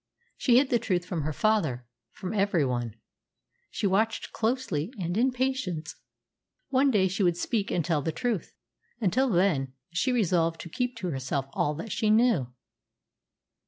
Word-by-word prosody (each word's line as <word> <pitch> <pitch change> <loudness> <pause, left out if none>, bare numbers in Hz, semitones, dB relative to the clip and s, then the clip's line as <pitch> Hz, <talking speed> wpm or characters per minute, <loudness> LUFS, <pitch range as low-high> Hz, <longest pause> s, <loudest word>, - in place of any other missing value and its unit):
She 245 -2 +4
hid 265 +1 +3
the 240 - +4
truth 185 -6 -1
from 175 -3 -3
her 155 +2 -2
father 155 - +1 0.3
from 185 +2 -5
every 195 -7 +2
one. 120 -4 -2 0.7
She - - -3
watched 215 +3 +1
closely 220 - -1
and 175 -1 -2
in 250 +4 +3
patience. 250 -12 -2 0.7
One 275 +1 +3
day 200 -7 +3
she 195 +4 -2
would 175 -3 +3
speak 210 +1 -1
and 170 - 0
tell 160 -4 +1
the 160 - -1
truth. 235 -2 -3 0.4
Until 250 +6 +2
then, 170 - +2 0.2
she 180 +10 +1
resolved 170 -8 +1
to 170 - -8
keep 245 +6 -2
to 185 -6 -3
herself 135 0 -2
all 150 +1 0
that 200 +8 -6
she 215 - 0
knew. 220 - +4
190 Hz, 160 wpm, -28 LUFS, 160-230 Hz, 0.7 s, She